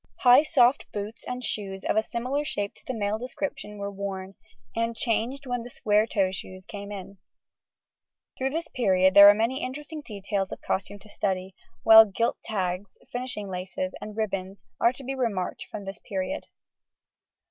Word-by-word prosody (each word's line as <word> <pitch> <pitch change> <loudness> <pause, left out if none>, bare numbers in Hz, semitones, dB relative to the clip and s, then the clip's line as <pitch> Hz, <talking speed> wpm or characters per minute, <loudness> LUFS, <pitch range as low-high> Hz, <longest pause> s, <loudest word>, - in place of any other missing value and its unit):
High, 250 +2 +8
soft 275 -4 +3
boots 210 +2 -5
and 250 0 -4
shoes 195 -4 -3
of - - 0
a 220 - +4
similar 250 +6 -2
shape 205 -8 -3
to - - -23
the 260 - -2
male 210 0 -1
description 245 -4 -5
were 200 0 -4
worn, 195 -1 -5 0.4
and 230 0 0
changed 245 +4 -1
when 245 -2 -2
the 240 - -8
square 215 -2 +2
toe 195 -4 +1
shoes 185 0 -8
came 205 -1 -7
in. 195 -1 -8 1.2
Through 265 +1 -1
this 325 +3 -3
period 190 -8 +3
there 200 0 +11
are 205 - +7
many 230 +5 0
interesting 295 +4 -5
details 200 -4 -3
of - - -6
costume 200 +1 -2
to 205 - -17
study, 190 -2 -2 0.3
while 220 0 +10
gilt 225 +4 -1
tags, 190 -2 -3
finishing 245 -4 -4
laces, 185 0 -4
and 215 0 -7
ribbons 195 -3 -3 0.2
are 235 - +5
to 265 +2 -10
be 265 +1 -3
remarked 225 -9 -2
from 205 -2 -7
this 195 0 -7
period. 195 +9 -4
210 Hz, 170 wpm, -27 LUFS, 195-245 Hz, 1.2 s, there